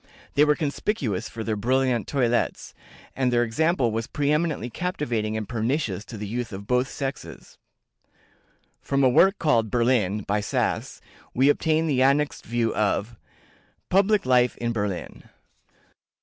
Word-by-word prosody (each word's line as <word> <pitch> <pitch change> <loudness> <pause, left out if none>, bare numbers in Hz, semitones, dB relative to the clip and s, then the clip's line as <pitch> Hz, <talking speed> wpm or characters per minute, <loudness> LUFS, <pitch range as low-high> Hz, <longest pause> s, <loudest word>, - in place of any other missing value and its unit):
They 145 +1 +5
were 150 0 +3
conspicuous 140 - -2
for 115 - -6
their 110 0 -1
brilliant 125 +1 +1
toilettes, 120 -4 -1 0.4
and 130 -2 +1
their 120 0 +3
example 130 +1 +1
was 115 +1 -3
pre 145 -1 -1
eminently 150 -5 0
captivating 120 - -2
and 110 -2 -4
pernicious 115 - -2
to 115 - -9
the 105 - -5
youth 115 +3 -4
of 100 0 -7
both 125 +3 +1
sexes." 135 0 -7 1.2
From 140 0 0
a 130 - +6
work 195 +10 +4
called 115 -9 +2
"Berlin," 115 -4 +1
by 105 +2 -1
Sass, 100 - -2 0.3
we 135 +3 +4
obtain 160 +2 +2
the 140 -5 +1
annexed 140 +2 +1
view 115 0 0
of 105 +2 -1 0.8
PUBLIC 200 +2 +3
LIFE 125 -1 +3
IN 120 0 -2
BERLIN. 100 -5 -4
125 Hz, 145 wpm, -25 LUFS, 110-145 Hz, 1.2 s, a